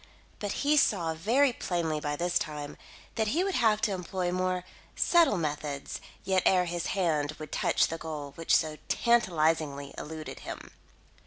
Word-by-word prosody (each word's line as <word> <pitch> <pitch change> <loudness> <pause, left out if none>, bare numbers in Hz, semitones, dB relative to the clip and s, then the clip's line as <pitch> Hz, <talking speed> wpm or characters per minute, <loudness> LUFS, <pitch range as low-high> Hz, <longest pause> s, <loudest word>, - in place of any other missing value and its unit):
But 205 -1 -2
he 300 +1 +4
saw, 175 - +3
very 240 - +3
plainly 165 -7 -1
by 145 -1 -2
this 175 +3 +1
time, 150 -2 -5 0.4
that 220 -1 0
he 320 - +1
would 390 0 -1
have 220 -6 +3
to 225 -2 +1
employ 180 -1 -2
more 185 0 0 0.3
subtle 335 - +4
methods 150 -3 -3 0.2
yet 190 -1 +2
ere 180 -1 +4
his 175 0 -3
hand 155 -5 +1
would 155 -1 -8
touch - - +2
the 165 - -4
goal 150 -3 -6
which 165 - +2
so 155 -1 -2
tantalisingly 160 - +1
eluded 155 0 -7
him. - - -8
175 Hz, 160 wpm, -29 LUFS, 155-205 Hz, 0.4 s, he